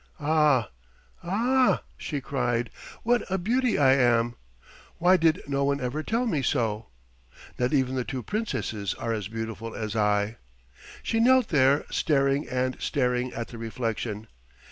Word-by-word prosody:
"Ah! 150 - +2 0.5
Ah!" 245 +8 +2
she 145 -3 -4
cried. 120 -3 -1 0.3
"What 240 0 +3
a 190 - 0
beauty 235 +5 +1
I 135 -2 +5
am; 120 -3 +3 0.6
why 180 +2 +5
did 165 -3 +2
no 140 0 0
one 140 0 +1
ever 130 +5 -2
tell 230 +9 -1
me 160 - 0
so? 115 -5 -1 0.7
Not 125 0 +1
even 130 -3 +1
the 130 -1 -1
two 130 -1 -5
Princesses 115 - -3
are 115 0 -3
as 105 -4 -3
beautiful 115 0 -6
as 110 -1 -4
I." 105 +1 +1 0.7
She 225 - 0
knelt 255 0 +4
there, 140 -2 +3
staring 140 -1 +1
and 130 0 -1
staring 125 -2 0
at 115 - -5
the 115 - -9
reflection. 115 -2 -3
130 Hz, 145 wpm, -26 LUFS, 115-160 Hz, 0.7 s, I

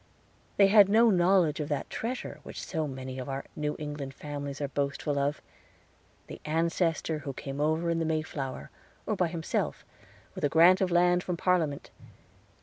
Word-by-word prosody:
They 200 - +7
had 200 0 +7
no 225 +2 +5
knowledge 175 -4 +3
of 150 - -3
that 145 - -2
treasure 245 +3 -4
which - - -8
so 160 -1 -2
many 130 -1 -6
of 130 - -6
our 135 0 -4
New 150 0 -2
England 145 -2 -6
families 145 -1 -6
are 145 - -1
boastful 140 +1 -2
of 145 +2 -1 0.8
the - - -10
Ancestor 165 0 0
who 140 -1 -6
came 135 +2 -5
over 160 +3 +1
in 165 - 0
the 165 - 0
Mayflower, 155 -4 -3 0.3
or 215 - -1
by 180 -3 +1
himself, 165 -1 -3 0.5
with - - -8
a 145 - +3
grant 170 +5 +6
of 190 - +2
land 175 0 +3
from 180 -1 -3
Parliament. 165 -6 0
155 Hz, 170 wpm, -29 LUFS, 145-180 Hz, 0.8 s, They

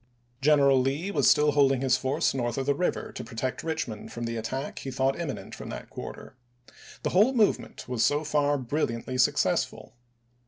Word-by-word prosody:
General 140 -2 +5
Lee 145 +9 -1
was - - +3
still 150 0 +4
holding 135 -2 +3
his 130 -2 +3
force 130 +1 0
north 120 -2 -2
of 135 - -1
the 140 - +3
river 175 +6 -2
to - - -7
protect 125 +1 -4
Richmond 155 -9 -4
from 120 - -6
the 115 0 -3
attack 130 +5 -4
he 135 - -6
thought 135 +1 0
imminent 140 -10 -5
from - - -8
that - - -8
quarter. - - -8 0.7
The - - -1
whole 210 +8 +4
movement 220 -4 0
was 125 -2 0
so 145 +1 +2
far 145 -1 +1
brilliantly 130 -2 -2
successful. - - +1
135 Hz, 180 wpm, -27 LUFS, 125-150 Hz, 0.7 s, General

